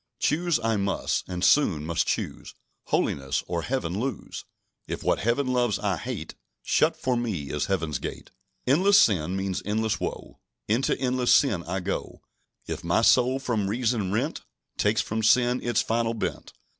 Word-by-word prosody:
"Choose 170 -2 +1
I 115 -1 0
must, 100 -1 -1
and 90 -1 -1
soon 90 - +3
must 85 0 0
choose - - -3 0.3
Holiness, 70 -1 0
or 85 -1 -2
Heaven 105 -7 -2
lose. 130 -2 -4 0.4
If - - -5
what - - +1
Heaven 120 +6 +1
loves 125 -4 +1
I - - -1
hate, - - -5 0.3
Shut - - +2
for 130 -1 0
me 100 - -3
is 75 -1 -1
Heaven's 80 -8 -1
gate! - - -7 0.3
"Endless 185 +10 +5
sin 90 -4 +2
means 95 -1 -2
endless 110 +1 -1
woe; - - -6 0.3
Into 115 +6 +1
endless 125 -1 +1
sin 110 -12 +4
I 95 +3 -3
go 95 +2 -4 0.4
If - - -5
my 85 +7 +2
soul, 125 +2 +4
from 115 -7 -1
reason 110 -3 0
rent, 125 +9 -1 0.3
Takes - - +2
from 110 +1 -3
sin 120 +3 +3
its 120 -2 +1
final 115 0 0
bent. 110 - -4
110 Hz, 160 wpm, -26 LUFS, 95-125 Hz, 0.4 s, Endless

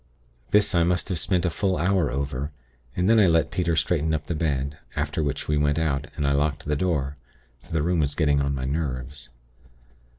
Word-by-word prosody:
This, 105 0 +3
I 85 - +4
must 90 +3 +1
have 90 -4 -1
spent 90 0 0
a 90 - +1
full 95 +1 0
hour 90 -1 +2
over, 70 +1 -3 0.4
and 90 +1 +1
then 115 +1 +5
I 100 - +6
let 80 -1 +2
Peter 85 -2 0
straighten 80 0 +1
up 75 -1 -4
the 85 - -2
bed; 75 -3 -1 0.2
after - - -1
which 70 -3 -2
we 75 - +1
went 75 0 +2
out, 75 -3 0
and 75 - -1
I 70 - +2
locked 70 +1 0
the 75 - 0
door; 75 -5 -1 0.4
for - - -19
the 80 -2 +1
room 85 +1 +1
was 70 -1 +1
getting 75 -3 +2
on 70 0 0
my 65 -1 -3
nerves. 70 -2 -4
75 Hz, 210 wpm, -25 LUFS, 70-85 Hz, 0.4 s, I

